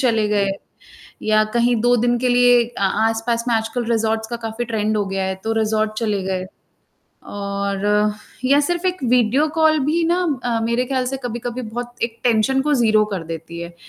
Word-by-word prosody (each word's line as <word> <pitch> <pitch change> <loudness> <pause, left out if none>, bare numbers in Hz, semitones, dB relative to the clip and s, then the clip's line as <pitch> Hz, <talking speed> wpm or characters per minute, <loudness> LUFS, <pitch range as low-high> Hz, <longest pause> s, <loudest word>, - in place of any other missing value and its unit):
चले 225 -5 +2
गए, 200 -2 +1 0.7
या 215 0 +3
कहीं 240 0 +3
2 245 0 +4
दिन 240 +1 +1
के 250 +1 0
लिए 245 -1 +5
आ 195 - +2 0.2
आस-पास 230 +1 -1
में 235 - +2
आजकल 225 +2 -1
रिज़ॉर्ट्स 220 -1 0
का 235 - -3
काफ़ी 225 +2 -3
ट्रेंड 215 -2 -1
हो 205 -1 0
गया 195 0 -2
है, 190 0 -1
तो 225 - 0
रिज़ॉर्ट 215 0 0
चले 210 -4 -1
गए। 185 -1 -2 0.8
और 200 0 -3 0.6
या 280 +3 +4
सिर्फ़ 350 +4 -1
एक 365 0 +1
वीडियो 250 +4 +3
कॉल 315 -1 +4
भी 330 +3 +1
ना 345 +1 +2 0.3
अ, 230 -2 0
मेरे 235 +2 0
ख़याल 260 0 -1
से 270 +1 -2
कभी-कभी 240 +1 -4
बहुत 240 +2 -6
एक 230 -1 -2
टेंशन 245 +3 +2
को 295 0 +1
0 220 -4 +3
कर 180 -4 -3
देती 165 +1 -7
है, 170 0 -7
230 Hz, 190 wpm, -20 LUFS, 215-245 Hz, 0.8 s, लिए